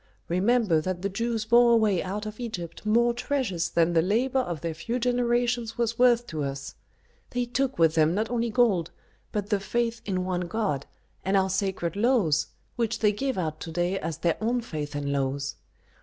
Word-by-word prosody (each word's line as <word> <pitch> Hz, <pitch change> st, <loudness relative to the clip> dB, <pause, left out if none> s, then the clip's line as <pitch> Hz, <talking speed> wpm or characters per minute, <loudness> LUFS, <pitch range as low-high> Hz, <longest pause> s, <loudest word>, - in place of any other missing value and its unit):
Remember 190 Hz, -1 st, +3 dB
that 185 Hz, +2 st, -3 dB
the 200 Hz, -, 0 dB
Jews 225 Hz, +2 st, -2 dB
bore 235 Hz, +1 st, +6 dB
away 215 Hz, -6 st, +3 dB
out 200 Hz, +3 st, -4 dB
of 215 Hz, +1 st, -7 dB
Egypt 195 Hz, -5 st, -6 dB
more 235 Hz, +2 st, +4 dB
treasures 240 Hz, -, -1 dB
than 170 Hz, 0 st, +2 dB
the 165 Hz, -, +4 dB
labor 240 Hz, +9 st, +1 dB
of 175 Hz, -, -3 dB
their 165 Hz, 0 st, -2 dB
few 230 Hz, +10 st, -3 dB
generations 240 Hz, -1 st, 0 dB
was 230 Hz, -1 st, -1 dB
worth 240 Hz, -1 st, +5 dB
to 155 Hz, -7 st, -4 dB
us; 135 Hz, 0 st, -5 dB, 0.6 s
they 245 Hz, 0 st, -1 dB
took 260 Hz, +2 st, -1 dB
with 165 Hz, -1 st, +4 dB
them 160 Hz, +1 st, +3 dB
not 220 Hz, +3 st, -1 dB
only 235 Hz, -1 st, 0 dB
gold, 215 Hz, -8 st, +2 dB, 0.4 s
but 210 Hz, 0 st, -3 dB
the 205 Hz, -, +3 dB
faith 230 Hz, +3 st, -1 dB
in 185 Hz, -2 st, -2 dB
one 180 Hz, -1 st, -1 dB
god, 175 Hz, -10 st, -2 dB, 0.4 s
and 195 Hz, +1 st, +2 dB
our 190 Hz, 0 st, +2 dB
sacred 190 Hz, -3 st, -1 dB
laws, 205 Hz, -, +2 dB, 0.3 s
which 230 Hz, -1 st, 0 dB
they 210 Hz, -2 st, +3 dB
give 265 Hz, +4 st, -2 dB
out 155 Hz, -4 st, -2 dB
to 165 Hz, -, -6 dB
day 175 Hz, +3 st, 0 dB
as 160 Hz, -1 st, -4 dB
their 170 Hz, 0 st, 0 dB
own 240 Hz, +3 st, +1 dB
faith 150 Hz, -9 st, -5 dB
and 140 Hz, -1 st, -2 dB
laws. 140 Hz, 0 st, -2 dB
205 Hz, 190 wpm, -27 LUFS, 170-235 Hz, 0.6 s, bore